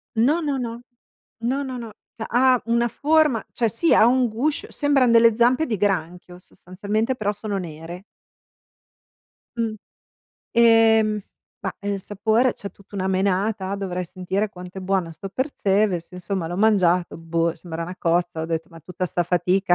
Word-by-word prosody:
No, 275 +10 +3
no, 285 -4 -1
no. 235 0 -5 0.6
No, 265 +4 -1
no, 260 -2 -5
no. 230 -2 -7 0.4
Ha 255 0 +4
una 235 +1 +2
forma 300 -5 +2
cioè 235 - +1
sì, 325 - +2
ha 215 - +6
un 250 +1 +3
guscio 265 +8 -2
sembran 275 -4 +3
delle 230 -1 +6
zampe 250 +6 +3
di 220 -7 -2
granchio 180 -2 -2
sostanzialmente, 205 +7 -3
però 210 -3 -1
sono 205 -1 -4
nere. 170 +1 -7 1.5
Mh. 225 -2 -1 0.8
Ehm, 225 -2 +4 0.4
ma - - -3
il 200 -1 -3
sapore, 220 +6 +1
c'è 200 - -8
tutta 200 +1 -19
una 190 -1 -1
menata, 190 +1 0
dovrei 180 -2 -3
sentire 185 +4 -2
quanto 180 0 -10
è - - -6
buona 185 -3 -1
sto 180 +5 -7
Percebes, 200 - 0
insomma 180 0 -3
l'ho 175 - -4
mangiato, 185 -5 +2
boh, 165 0 -1
sembra 170 -2 -6
una 180 +2 -7
cozza. 175 -1 0
Ho 160 - -3
detto, 165 -1 -3
ma 165 - -13
tutta 180 +3 -5
sta 175 - -1
fatica? 180 +1 +2
200 Hz, 160 wpm, -23 LUFS, 180-235 Hz, 1.5 s, ha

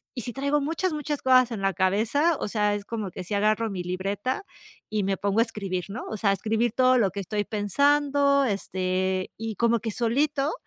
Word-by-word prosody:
y 245 - -3
si 240 - -5
traigo 280 +2 0
muchas, 325 +4 -1
muchas 295 -1 -3
cosas 255 -2 +4
en 210 -4 -4
la 195 -1 +1
cabeza, 225 - +2
o - - -2
sea, 210 -1 +1
es 200 -1 -6
como 215 -5 -4
que 185 - -7
si 205 - -5
agarro 215 +2 +1
mi 185 -3 -4
libreta 200 - -2 0.5
y 215 -2 -1
me 195 0 0
pongo 200 +2 0
a - - +6
escribir, 195 -6 -4
¿no?, 235 +5 -6
o 215 - -4
sea, 200 -1 +2
escribir 220 +3 0
todo 255 0 +4
lo 200 -6 +2
que 200 - -5
estoy 205 +2 -2
pensando, 280 +6 +2
este, 185 -2 -1
y 225 -1 -4
como 235 +1 +2
que 220 0 -4
solito 275 - 0
220 Hz, 210 wpm, -26 LUFS, 195-265 Hz, 0.5 s, a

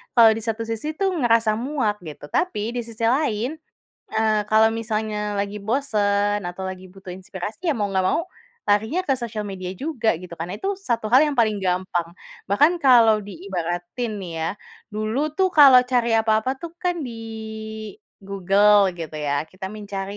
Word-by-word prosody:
kalau 230 -2 +8
di - - -3
satu 230 0 -2
sisi 225 +7 -4
itu 390 - -1
ngerasa 230 -3 +3
muak 245 -5 -1
gitu. 150 -2 -9
Tapi 230 - -1
di 245 - -1
sisi 230 0 -7
lain, 250 +1 0 0.6
eee, 220 -1 +2
kalau 220 +1 +6
misalnya 215 -2 -2
lagi 200 +1 -3
bosan 205 -3 +1
atau 180 +2 -6
lagi 185 0 -6
butuh 190 0 -10
inspirasi, 190 - -6
ya 300 - +2
mau 205 -2 -1
nggak 190 -1 +1
mau 335 - 0 0.4
larinya 220 - +2
ke 275 - +1
sosial 230 -4 -4
media 185 -2 -5
juga 240 - 0
gitu 180 -1 -11
kan, 165 +1 -5
itu 390 +1 -2
satu 235 - -2
hal 270 +4 +7
yang 290 - -3
paling 215 -3 +2
gampang. 180 -2 -1 0.4
Bahkan 310 - +4
kalau 230 -5 +6
diibaratin 185 +3 -4
nih 180 -3 -7
ya, 160 - 0 0.4
dulu 220 +8 -1
tuh 380 -1 +3
kalau 275 -4 +9
cari 245 -2 +1
apa-apa 220 +4 +1
tuh 340 -1 -7
kan 355 -1 0
di 235 - -7 1.1
Google 200 +1 +3
gitu 165 -2 -7
ya 145 -1 -1
kita 185 +2 -8
mencari, 200 -1 -6
215 Hz, 165 wpm, -23 LUFS, 195-240 Hz, 1.1 s, kalau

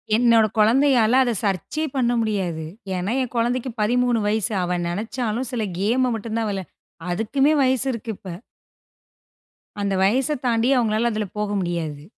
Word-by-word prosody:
என்னோட 230 -1 +5
குழந்தையால 250 +1 +4
அதை 240 -2 0
சர்ச்யே 200 - -1
பண்ண 240 -2 +2
முடியாது. 190 -7 -2 0.3
ஏனா, 185 +4 -2
என் 250 -1 -4
குழந்தைக்கு 245 +2 0
13 245 +1 +2
வயசு. 215 0 0
அவ 180 0 -1
நினைச்சாலும் 225 +5 -3
சில 240 -3 -2 0.2
கேம்ம 245 +5 +1
மட்டும் 225 +1 -4
தான் 220 -2 -1
விளையாட 195 -2 -5 0.4
அதுக்குமே 270 - +2
வயசு 260 0 +2
இருக்கு 230 -1 -6
இப்ப. - - -14 1.5
அந்த 200 -1 0
வயச 260 +9 +2
தாண்டி 235 +1 +2
அவங்களால 230 0 +1
அதில 215 0 -2
போக 210 -1 -1
முடியாது. 165 -5 -3
225 Hz, 145 wpm, -22 LUFS, 205-245 Hz, 1.5 s, என்னோட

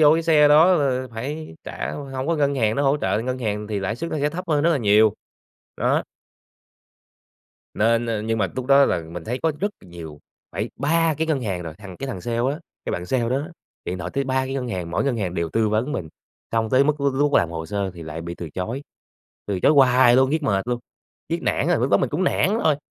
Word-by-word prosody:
vô 150 -1 +7
cái 165 - 0
xe 150 -3 +5
đó 160 +5 +6
là 130 -4 0
phải 140 - -5
trả - - -4
hổng 135 -2 -5
có 165 0 +1
ngân 140 -1 +1
hàng 110 -4 +1
nó 140 - +1
hỗ 140 +1 +3
trợ, 145 - 0
ngân 130 +1 -3
hàng 105 -3 -2
thì 105 -2 -3
lãi 100 +4 -2
suất 165 +7 -5
nó 155 - -2
sẽ 145 - +1
thấp 180 +3 -5
hơn 150 -2 +2
rất 170 - +4
là 160 - +2
nhiều, 105 -2 +4 0.6
đó. - - +1 1.7
Nên 115 +2 +2 0.2
nhưng 115 0 0
mà - - +2
túc 130 -1 -3
đó 140 0 +6
là 90 - 0
mình 85 0 -7
thấy 120 +3 -3
có 160 - +2
rất 205 - 0
là 90 - -17
nhiều, 80 -4 -10 0.3
phải - - -3
3 160 +3 +2
cái 160 - 0
ngân 155 -4 0
hàng 95 -5 -2
rồi. 80 -2 -7
Thằng 95 -4 -10
cái 135 - -5
thằng 125 -9 -5
sale 115 +4 -3
á, 150 - -7 0.2
cái - - -3
bạn 90 0 -4
sale 125 +4 0
đó 130 +3 +1
đó, 155 - -6 0.4
điện 90 - -4
thoại 90 0 -5
tới 140 0 0
3 130 0 0
cái 135 +1 -4
ngân 125 -2 -3
hàng, 90 -5 -4
mỗi 85 - 0
ngân 130 -4 0
hàng 95 -5 -2
đều 85 -2 -1
tư 110 +2 +1
vấn 115 +7 0
mình. 80 - -4 0.4
Xong 115 -1 0
tới 130 +2 +5
mức 150 0 0
lúc 140 -1 +1
lúc 145 +1 +1
làm 85 - +3
hồ 80 -1 -5
sơ 100 +1 -2
thì 85 - -9
lại 80 0 -6
bị 85 +1 -6
từ 85 -2 -7
chối, 110 - -4 0.6
từ 95 -3 -2
chối - - +5
hoài 130 -3 +6
luôn, 130 +1 +4
riết 160 0 0
mệt 100 -2 0
luôn, 120 - 0 0.5
riết 165 +1 -2
nản - - 0
rồi, 175 - +3
lúc 125 +3 0
đó - - +6
mình - - -1
cũng 170 +5 0
nản 205 +4 +2
rồi. 155 -2 +4
130 Hz, 255 wpm, -23 LUFS, 100-145 Hz, 1.7 s, vô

